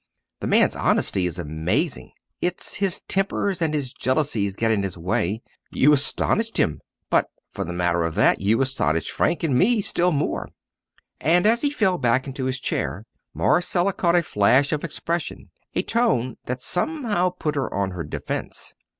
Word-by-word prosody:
The - - -3
man's - - +4
honesty 90 -2 +1
is 85 - -5
amazing, 80 +2 -2 0.3
it's 180 0 -2
his 195 -3 0
tempers 195 -1 0
and 160 -2 +1
his 140 -5 -2
jealousies 130 -8 0
get 115 +1 +1
in 105 -2 +2
his 95 -2 -4
way. 90 +5 -1 0.3
You 150 +3 +4
astonished 220 +10 0
him; 75 - +1 0.3
but, - - +3 0.2
for - - -4
the 90 - -5
matter 85 -1 0
of 85 -1 -2
that, - - +3
you 110 +5 +2
astonished 85 - 0
Frank 170 -1 0
and 155 -5 +1
me 220 - +4
still 180 -3 +1
more!" 145 -2 -1 0.7
And 175 +4 +3
as 230 +2 +4
he 290 - +2
fell 205 -10 +1
back 125 +1 +2
into 135 -1 -4
his 130 +1 -1
chair, - - -2 0.3
Marcella 180 +2 +2
caught 170 -1 +1
a 175 - +4
flash 130 +3 +3
of 150 - -2
expression, 170 0 -4 0.2
a - - +1
tone 130 - +1
that 125 +1 -3
somehow 210 - 0
put 170 -4 -3
her 140 -2 -2
on 100 -1 -1
her 90 -2 -5
defence. 75 - -5
140 Hz, 170 wpm, -23 LUFS, -, 0.7 s, man's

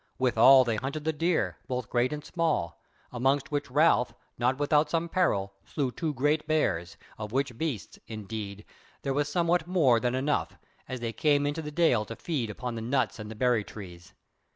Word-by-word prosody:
Withal 130 +1 +6
they 115 -3 -1
hunted 140 +6 -4
the 160 +1 0
deer, 165 +3 0
both 125 -3 -3
great 125 +1 +2
and 150 0 -5
small; 85 - -1 0.3
amongst 135 +4 0
which 145 -2 -2
Ralph, 145 -3 +3 0.2
not 125 +2 +1
without 150 +1 +2
some 165 0 0
peril, 100 - +1
slew 135 -4 -2
two 160 +4 -2
great 150 +3 +1
bears, 90 - 0 0.2
of 105 -1 -5
which 135 0 -1
beasts, 135 -6 -4
indeed, 105 -1 -6 0.4
there 135 - 0
was 145 +1 0
somewhat 170 0 +1
more 150 -10 +4
than 125 +1 0
enough, 140 +3 -1 0.3
as 130 -2 -4
they 115 -1 -3
came 145 +1 +2
into 145 +3 -1
the 150 - -5
dale 150 -8 +3
to 115 - -7
feed 130 -5 -2
upon 125 +3 -5
the 115 - -5
nuts 120 0 0
and 105 0 -7
the 110 - -7
berry 120 -1 +2
trees. 90 -5 -11
130 Hz, 185 wpm, -28 LUFS, 115-150 Hz, 0.4 s, Withal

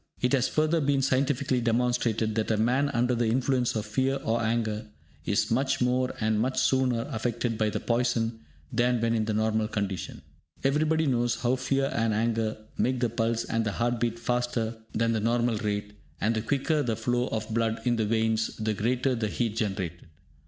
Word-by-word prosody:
It 125 +2 +1
has 130 -2 +3
further 155 +1 +1
been 140 -1 +2
scientifically 130 -1 +1
demonstrated 115 -2 +1
that 110 0 -1
a 110 - +2
man 125 +6 +2
under 125 -2 +1
the 120 -1 +1
influence 125 +1 +1
of 110 -1 -2
fear 130 +5 0
or 115 +1 0
anger 110 -1 -1 0.4
is - - +1
much 130 +4 +1
more 125 +1 +1
and 110 -1 +1
much 130 +4 0
sooner, 130 -3 +2
affected 115 +1 -1
by 110 0 +1
poison 115 0 0 0.3
than 120 0 +2
when 115 0 +1
in 110 -1 +1
the 110 -1 -1
normal 110 0 +1
condition. 100 -4 -4 0.4
Everybody 155 +3 +2
knows 120 -3 +1
how 125 +1 +2
fear 135 +1 0
and 115 -2 +1
anger 110 0 0 0.2
make 130 0 +1
the 120 -1 +1
pulse 115 0 0
and 115 0 -1
the 105 -2 -2
heart 120 +2 0
beat 115 -1 0
faster 120 -1 -1 0.2
than 115 +1 +1
the 110 - +1
normal 115 +1 +1
rate, 105 0 -3 0.3
and 110 +4 +1
the 110 - 0
quicker 145 +6 0
the 115 -5 -1
flow 120 +3 0
of 110 0 -3
blood 115 -1 0
in 120 -1 +2
the 110 - +1
veins, 110 0 0
the 110 -1 -1
greater 125 +5 0
the 115 -3 -1
heat 110 0 -2
generated. 95 -6 -3
115 Hz, 190 wpm, -27 LUFS, 110-125 Hz, 0.4 s, has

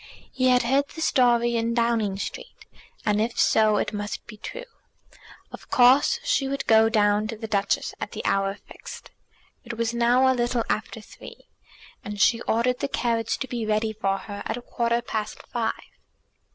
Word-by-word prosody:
He 255 -1 +1
had 250 -1 +4
heard 270 +4 +2
the - - -11
story 240 -5 +3
in 230 0 0
Downing 230 -4 +1
Street, 485 - -7 0.4
and 210 0 +2
if 230 +2 -2
so 215 -1 +4
it - - -2
must 205 0 -5
be 215 - -11
true. - - -8 0.9
Of - - -12
course 260 0 +5
she 270 - +1
would 275 +1 -3
go 225 0 +5
down 210 -1 +2
to 225 0 -6
the 225 - -6
Duchess 200 -2 -1
at - - -4
the - - -7
hour 195 0 +1
fixed. - - -11 0.5
It 235 -1 -7
was 230 0 -1
now 240 +2 +3
a 260 - +4
little 240 -1 0
after 220 +1 -3
three, - - -14 0.5
and 205 0 -6
she 230 +2 +3
ordered 250 +2 +1
the - - -1
carriage 230 -4 -1
to 265 - -4
be 240 -2 -4
ready 215 0 0
for 195 -2 -1
her 200 0 -8
at - - -3
a 245 - -9
quarter 235 0 -1
past 215 -3 -4
five. 230 -2 0
230 Hz, 180 wpm, -25 LUFS, 215-245 Hz, 0.9 s, course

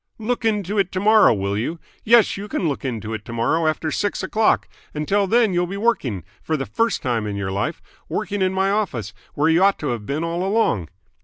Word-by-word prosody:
Look 235 +2 -2
into 210 -2 0
it 190 -2 +1
tomorrow, 210 +3 +5
will 100 -2 -1
you? 140 +11 -3 0.2
Yes, 230 0 +5
you 200 +1 -6
can 185 - -1
look 140 - -3
into 110 -4 -4
it 105 -2 -5
to 115 - -7
morrow 155 +8 +1
after 155 0 -1
six 205 +5 -1
o'clock! 220 0 +2 0.3
Until 195 +7 +1
then 225 -1 +3
you'll 175 0 +1
be 195 +3 -5
working 145 - 0 0.2
for 155 - -1
the 135 - -3
first 230 -1 -1
time 115 -5 -1
in 105 - -3
your 100 -1 -3
life 100 +2 -3 0.3
working 205 -1 -2
in 185 0 +2
my 190 +1 +1
office, 145 - -2 0.2
where 145 +2 +2
you 165 +3 +4
ought 200 0 +4
to 150 - -3
have 115 -4 -4
been 145 +4 -2
all 170 +2 -2
along." 190 - +1
170 Hz, 220 wpm, -22 LUFS, -, 0.3 s, tomorrow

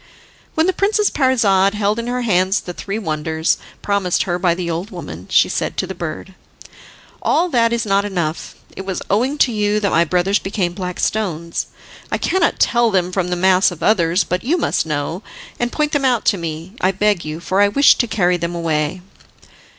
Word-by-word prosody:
When 320 - +3
the 375 - +2
Princess 420 +2 +1
Parizade 210 -7 +2
held 210 +1 0
in 230 - -4
her 250 0 -2
hands 190 -2 +2
the 175 - -7
three 200 +4 -5
wonders 160 -4 -1 0.2
promised 200 -3 +1
her 175 -1 -2
by 175 -2 +2
the 175 -1 -4
old 170 +4 -3
woman, - - -8
she - - +4
said - - -3
to - - 0
the - - -6
bird: - - -6 0.9
"All 350 +3 +2
that 230 -5 +2
is 235 0 -1
not 200 -1 +2
enough. 175 -6 -3 0.2
It 190 - -6
was 190 -1 -4
owing 250 +8 +1
to 260 - +3
you 210 -1 +1
that 200 -2 0
my 165 - +4
brothers 180 +4 +1
became 190 -3 -2
black 180 -1 -5
stones. 170 -6 -2 0.4
I - - +1
cannot 370 -2 +1
tell 235 -1 +3
them 185 -3 0
from 185 -1 -1
the 180 - -1
mass 185 +1 +4
of 175 -4 -8
others, 180 -3 +3
but 180 +1 -3
you 310 +9 +1
must 315 - 0
know, 150 +4 -3 0.4
and 240 0 -1
point 300 -1 0
them 290 -2 0
out 250 -4 +2
to - - -4
me, 165 +2 -6
I 185 - +3
beg 200 -1 +1
you, 155 +1 -5
for 185 +3 0
I 205 - +6
wish 280 +8 +5
to 240 - +2
carry 180 -5 +1
them 170 0 -3
away." 160 +1 -1
195 Hz, 205 wpm, -19 LUFS, 175-230 Hz, 0.9 s, I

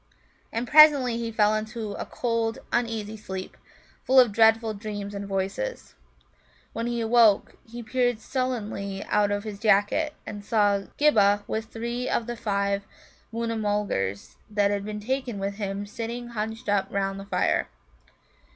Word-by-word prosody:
And 235 +2 -2
presently 290 -6 +7
he 230 -1 -3
fell 215 -1 +3
into 215 0 -3
a - - -5
cold, 230 -2 -1 0.2
uneasy 225 -3 -1
sleep, 190 -3 -7 0.5
full 260 +1 +5
of 245 -4 +6
dreadful 225 +1 +4
dreams 205 -1 -6
and 200 0 -5
voices. 195 - -3 0.8
When 230 +1 -3
he 240 -1 -1
awoke, 225 -2 +4
he 240 +1 -7
peered 245 0 0
sullenly 215 -6 -3
out 210 -1 +2
of 205 0 -1
his 210 -2 -7
jacket, 215 +9 +2
and 205 -1 -7
saw 205 -2 +2
Ghibba 205 -9 +4
with 220 0 -3
three 235 +3 -4
of 235 - 0
the 240 +1 -4
five 200 -2 -1 0.4
Moona 230 0 -2
mulgars 205 - -2
that 205 -1 +2
he 205 +1 -2
had 210 0 -5
taken 255 -2 -2
with 200 +1 -3
him 200 -1 -3
sitting 235 +3 -6
hunched 220 +1 -5
up 205 -1 +1
round 195 0 -2
the 195 - -8
fire. - - 0
215 Hz, 150 wpm, -26 LUFS, 200-235 Hz, 0.8 s, presently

